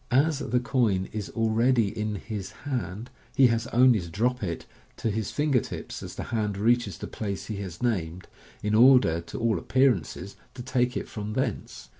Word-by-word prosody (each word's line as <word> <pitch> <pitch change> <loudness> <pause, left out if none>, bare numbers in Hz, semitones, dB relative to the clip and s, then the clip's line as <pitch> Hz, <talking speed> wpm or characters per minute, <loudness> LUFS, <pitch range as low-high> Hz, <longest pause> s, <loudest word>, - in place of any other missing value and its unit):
As 140 +3 +3
the 125 -3 0
coin 115 -7 +1
is 105 -2 -4
already 115 0 +2
in 105 -1 -2
his 100 -2 -5
hand, 120 -4 -4 0.2
he 135 - +6
has 115 0 -2
only 125 -1 +5
to 85 -2 -7
drop 120 +9 0
it 85 -5 -4 0.3
to 115 - -1
his 110 -1 -2
finger 145 -3 +2
tips - - -7
as - - -8
the - - -4
hand 105 -3 0
reaches 110 -3 +2
the - - -6
place 100 -3 -4
he 105 - -5
has 95 +1 -6
named, 90 -7 -1 0.4
in 105 0 0
order, 120 -8 +6
to 85 - -8
all 115 -2 +1
appearance, 130 - +2 0.4
to 125 - -7
take 125 0 0
it - - -4
from 105 0 -5
thence. 130 -3 -3
115 Hz, 185 wpm, -27 LUFS, 100-125 Hz, 0.4 s, he